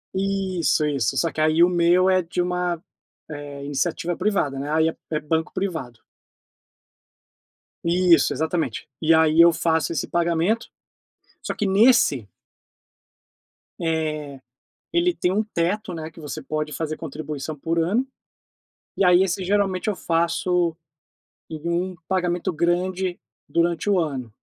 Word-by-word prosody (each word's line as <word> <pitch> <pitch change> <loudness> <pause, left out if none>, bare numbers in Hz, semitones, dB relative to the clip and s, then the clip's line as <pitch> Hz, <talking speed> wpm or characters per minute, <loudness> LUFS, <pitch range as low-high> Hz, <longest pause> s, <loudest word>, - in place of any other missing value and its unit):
Isso, 190 -5 0
isso, 135 -3 0
só 165 +4 +1
que 155 - -3
aí 155 +2 +4
o 175 - +5
meu 175 +1 +3
é 185 -1 +4
de 175 +1 -5
uma, 180 -1 0 0.5
eh, 145 -1 -7
iniciativa 170 +4 -1
privada, 155 -11 0
né, 145 +2 -4
aí 160 +1 +3
é - - -7
é 155 - -1
banco 160 +2 -1
privado. 160 - -4 1.8
Isso, 170 -3 +4
exatamente, 160 -4 -2
e 160 +1 +4
aí 160 0 +5
eu 170 0 +8
faço 160 0 0
esse 165 - -2
pagamento, 170 +6 0 0.7
só - - -3
que 210 - -1
nesse 195 - +4 1.5
eh, 155 -4 -2 0.5
ele 345 +1 +2
tem 180 - 0
um 210 +3 +2
teto, 195 -1 -2
né, 160 -1 -6
que 165 - -14
você 145 -3 -6
pode 155 0 -3
fazer 155 +2 -3
contribuição 150 -1 -6
por 165 +3 -2
ano. 200 +11 +1 0.9
E 195 - +3
aí 180 +1 +6
esse, 190 0 -1
geralmente, 195 +1 0
eu 210 - -1
faço 170 0 0 0.7
em 160 - -6
um 180 +2 -1
pagamento 180 -1 0
grande 180 +2 0 0.3
durante 170 +3 0
o 195 -2 +3
ano 135 -8 -3
170 Hz, 135 wpm, -23 LUFS, 155-185 Hz, 1.8 s, eu